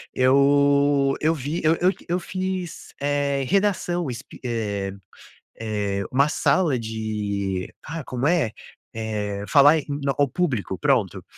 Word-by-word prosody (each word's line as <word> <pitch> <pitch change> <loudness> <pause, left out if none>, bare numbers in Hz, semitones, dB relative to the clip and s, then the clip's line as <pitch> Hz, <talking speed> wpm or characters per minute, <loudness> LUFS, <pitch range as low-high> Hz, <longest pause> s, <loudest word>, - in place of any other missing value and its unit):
eu 140 +1 +4
eu 155 +2 +3
vi 145 +4 -3
eu 160 +1 +4
eu 180 +3 +3 0.2
eu 175 +1 +1
fiz, 185 -1 -5
eh, 140 -1 0
redação 180 -4 +1
es 125 +1 -6 0.2
eh 105 -5 -2 0.7
eh, 105 -3 -2
uma 140 +3 +4
sala 155 -3 +2
de 105 -4 -3
ah, 165 -1 -6
como 125 0 -3
é? 165 -10 +2 0.4
Eh, 105 -2 -3
falar 145 +1 +6
em 150 - -4 0.3
ao 145 - +3
público, 125 - -2
pronto, - - +1
140 Hz, 125 wpm, -23 LUFS, 110-160 Hz, 0.7 s, falar